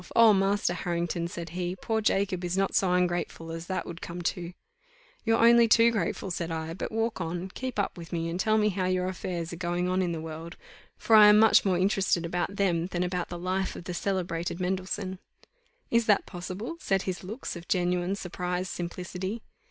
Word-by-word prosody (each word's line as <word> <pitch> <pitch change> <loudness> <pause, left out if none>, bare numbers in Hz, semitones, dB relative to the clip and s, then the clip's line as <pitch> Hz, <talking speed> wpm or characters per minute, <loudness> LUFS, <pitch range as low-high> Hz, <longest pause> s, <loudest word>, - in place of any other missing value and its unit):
Oh, 230 -2 +8
Master 195 -1 +2
Harrington," 170 -1 -2
said 170 -1 -6
he, 175 +1 -3
"poor 220 +4 -1
Jacob 195 -3 +1
is 175 +1 -1
not 195 0 +1
so 190 -2 +2
ungrateful 175 -2 -1
as 165 +1 -6
that 185 -1 -2
would 170 +1 -8
come 175 +1 -6
to." 175 0 -2 0.7
"You're 225 0 +3
only 235 0 +6
too 230 +1 +6
grateful," 195 -2 -2
said 170 -1 -3
I; 160 0 -3
"but 180 - -5
walk 225 -2 -1
on 175 +3 -3
keep 255 +4 -5
up 200 -3 -1
with 165 -1 -10
me, 165 -1 -1
and 170 +2 -3
tell 215 +2 +3
me 210 -1 +3
how 185 -2 -1
your 185 0 0
affairs 175 -2 -4
are - - -6
going 175 0 -1
on 185 +1 +1
in 180 -2 0
the 165 - -3
world, 160 +2 -7 0.4
for 225 - +3
I 210 -1 +10
am 210 0 +8
much 220 0 +6
more 185 -3 +2
interested 190 -2 +1
about 175 +3 -2
them 175 -4 +1
than 180 -1 -2
about 180 -1 -2
the 175 - -5
life 185 +2 -2
of - - -8
the 180 - -5
celebrated 175 -2 -2
Mendelssohn." 185 +1 -2 0.7
Is 230 -1 +3
that 205 -2 +4
possible! 185 - -6
said 195 - 0
his 185 -1 -4
looks 215 +6 -6
of 170 +1 -9
genuine 180 +1 +1
surprised 180 -1 -3
simplicity. 180 +4 -5
180 Hz, 205 wpm, -28 LUFS, 175-200 Hz, 0.7 s, I